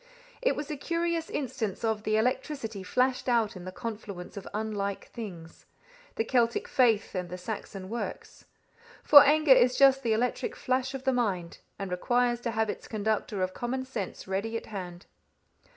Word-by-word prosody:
It - - +2
was 295 0 -5
a 300 - -3
curious 335 +2 -1
instance 235 -8 -3
of 220 -2 0
the 215 0 +1
electricity 250 -2 -1
flashed 255 +7 +1
out 230 -4 +2
in 180 -1 -9
the 185 - -5
confluence 205 -4 -7
of 200 - -7
unlike 205 -2 -3
things 175 -8 -9 0.5
the - - +1
Celtic 235 0 +1
faith 230 -5 +2
and 180 -2 -3
the 180 - -5
Saxon 195 0 -6
works. 230 +4 -6 0.6
For 285 -1 +10
anger 300 0 +6
is 250 0 +4
just 270 -1 +6
the 230 -4 +1
electric 240 +3 -1
flash 260 +1 -1
of 265 - -6
the 265 -1 +2
mind, 195 -9 -1 0.2
and 195 -2 -5
requires 240 +6 +1
to 240 - -2
have 220 -1 0
its - - -5
conductor 210 -2 -1
of 185 0 -2
common 260 +2 -3
sense 220 -9 -5
ready 200 +4 -2
at - - -8
hand. 180 -3 -7
225 Hz, 170 wpm, -29 LUFS, 200-255 Hz, 0.6 s, For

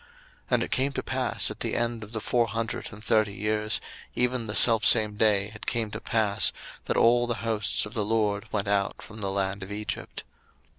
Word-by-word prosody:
02:012:041 475 - -25 0.5
And - - +1
it - - -6
came 135 +2 +1
to - - -3
pass - - 0
at - - -9
the - - -2
end 120 -1 -1
of 105 - -11
the 110 - -3
four 120 +2 +1
hundred 115 0 -3
and 105 +1 -12
thirty 110 -3 +2
years, 105 +1 0 0.4
even 125 -1 0
the 105 - -4
selfsame 110 -2 +5
day 105 -2 +2
it 105 - -10
came 115 -3 -1
to 105 - -6
pass, 110 -2 +2 0.3
that - - -1
all 120 +1 +4
the 120 - -1
hosts 110 -3 +1
of 105 - -10
the 110 -4 -1
LORD 105 -1 0
went 100 -1 -1
out 100 -1 0
from 110 0 -11
the 100 - -2
land 95 0 -2
of 95 +1 -8
Egypt. 105 +1 -5
110 Hz, 210 wpm, -27 LUFS, 105-115 Hz, 0.5 s, selfsame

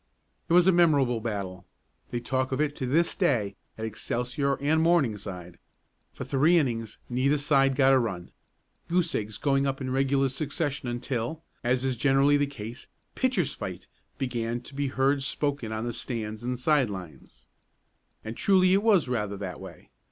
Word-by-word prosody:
It - - +2
was 175 0 +6
a 190 - +6
memorable 145 -9 +3
battle. 100 -5 -4 0.4
They 120 - -2
talk 130 +2 -1
of 130 - -1
it 150 -1 0
to 130 - -3
this 165 +6 +2
day 105 -7 +1 0.2
at 110 - -4
Excelsior 125 +5 -2
and 155 +4 +1
Morningside. 105 - 0 0.5
For - - -7
three 140 +7 +3
innings 115 -8 -1
neither 130 +4 +1
side 135 -2 +3
got 135 -1 +5
a 130 - +5
run, 95 -8 -4 0.6
goose 175 -1 +1
eggs 105 0 -3
going 140 -1 +1
up 135 0 -2
in 130 -2 -3
regular 135 +1 +2
succession 140 -1 -2
until, 120 +5 -3 0.2
as 125 +1 +1
is 130 -1 0
generally 135 +3 +3
the 145 0 +2
case 120 -1 -8 0.3
"pitchers' 200 - 0
fight" 90 -2 -6 0.3
began 120 -3 -2
to 130 - -11
be 140 0 -1
heard 135 +1 +1
spoken 140 -4 -2
on 110 +1 -3
the 120 - -3
stands 110 -3 -4
and 125 +1 -2
side 135 -2 +2
lines. 80 -10 -10 0.8
And 110 +1 -5
truly 185 +2 +4
it 195 - +4
was 205 -9 +4
rather 105 -5 -2
that 95 -2 -6
way. - - -12
130 Hz, 170 wpm, -27 LUFS, 115-145 Hz, 0.8 s, was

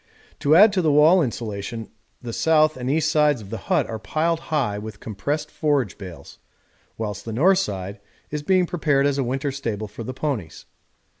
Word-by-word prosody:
To 145 +2 +4
add 205 +4 +7
to 190 - +2
the 155 -3 +2
wall 155 +5 +6
insulation 115 -3 -4 0.3
the 120 -1 -5
south 155 +1 +3
and 125 0 -4
east 155 +2 +1
sides 150 -4 +3
of 100 -2 -11
the 115 - -4
hut - - +3
are 110 -1 -5
piled 165 +7 0
high 125 -10 0
with 105 -1 -8
compressed 145 +9 -3
forage 140 - 0
bales, 90 -4 -10 0.6
whilst 105 -2 -4
the 115 - -6
north 180 - +4
side 100 - -4 0.3
is 150 0 -3
being 185 +4 +3
prepared 150 -6 +1
as 140 -1 +1
a - - +2
winter 135 +3 -2
stable 115 -6 -4
for 105 +3 -8
the 125 - -5
ponies. 125 - -4
135 Hz, 190 wpm, -23 LUFS, 110-155 Hz, 0.6 s, add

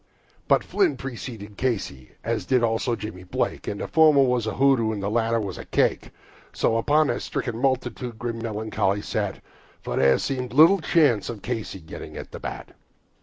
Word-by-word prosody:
But - - +4
Flynn 375 -6 +1
preceded 115 -5 -7
Casey, 100 - -3
as 110 -4 -2
did 125 -2 +3
also 115 +1 +1
Jimmy 105 -5 -7
Blake, 90 - -3
And 100 - -3
the - - -3
former 155 -3 +5
was 125 -3 +1
a 110 - -2
pudd'n, 130 -3 +3
and 100 -2 -5
the 100 - -1
latter 115 0 +1
was 100 -4 -5
a - - -8
fake, - - +1 0.4
So 115 - +1
upon 150 +7 +3
the - - -1
stricken 120 -3 -4
multitude 125 -2 -1
grim 115 -1 -4
melancholy 105 -3 -1
sat, 100 -3 -3 0.4
For - - -3
there 65 -1 +5
seemed 130 -2 -3
but - - -10
little 170 +5 +7
hope 145 - +3
of 115 -4 -6
Casey's 110 -7 -4
getting 80 - -9
to - - -5
the - - -10
bat. - - -7
115 Hz, 185 wpm, -24 LUFS, 105-130 Hz, 0.4 s, little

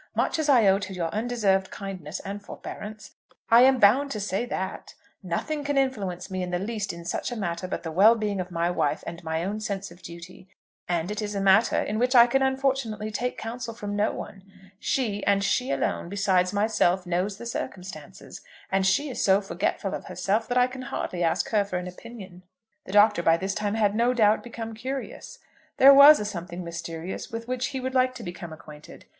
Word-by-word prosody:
Much - - 0
as 305 -1 0
I 245 -6 +6
owe 195 0 +4
to 190 -2 -6
your 170 -2 -2
undeserved 210 -4 +1
kindness 185 -4 -6
and 200 +1 -6
forbearance, 210 +1 -9 0.4
I 230 +1 +8
am 265 +1 +6
bound 250 +6 +4
to 220 - -4
say 205 +4 -2
that. 190 -5 -5 0.3
Nothing 285 - -3
can 285 0 -1
influence 205 -9 -1
me 185 0 -2
in 180 - -3
the 180 - -1
least 210 +2 -3
in 170 0 -10
such 175 - -3
a - - -3
matter 185 -4 -3
but 180 - -4
the 165 - -4
well 205 +8 +6
being 210 -4 -2
of 180 - -7
my 170 0 -1
wife, - - -1
and 170 0 -7
my 160 +1 -2
own 205 +4 -3
sense 200 -3 -4
of 175 +2 -15
duty. 170 +3 -11 0.4
And 175 +2 -1
it 210 +1 -3
is 210 -1 -4
a - - -1
matter 195 +4 +4
in 215 +1 -2
which 250 +2 +1
I 235 -1 +9
can 270 +3 +1
unfortunately 265 -5 -1
take 250 +3 -3
counsel 230 0 -6
from 205 -3 -5
no 205 +1 +1
one. 195 - -8 0.4
She, 215 -7 -1
and 200 0 +3
she 250 +6 0
alone, 170 - -1
besides 190 -2 +1
myself, 200 -3 +1
knows 180 +3 -1
the 235 - -9
circumstances, 180 -9 -7 0.3
and 190 0 +2
she 285 +10 +2
is - - -3
so 195 0 +5
forgetful 195 - -2
of - - -5
herself 215 +3 -1
that 245 - -1
I 250 - +5
can 255 +1 -7
hardly 185 -7 -4
ask 165 - +1
her 210 -2 +2
for 195 -2 -4
an 180 0 -5
opinion." 190 -1 -11 0.4
The - - -8
Doctor 210 -2 +5
by 165 -1 +4
this 190 +2 -3
time 210 0 -2
had 210 -2 +2
no 240 +3 +2
doubt 215 -2 +4
become 225 -2 -7
curious. 260 +5 -6 0.4
There 275 +1 +9
was 285 +2 +9
a 210 - -3
something 180 -3 -6
mysterious 170 +1 -6
with 230 0 -6
which 255 0 -1
he 265 - -4
would 260 0 -4
like 255 0 +2
to 240 - -8
become 175 -2 -7
acquainted. 150 -1 -13
205 Hz, 210 wpm, -26 LUFS, 180-235 Hz, 0.4 s, I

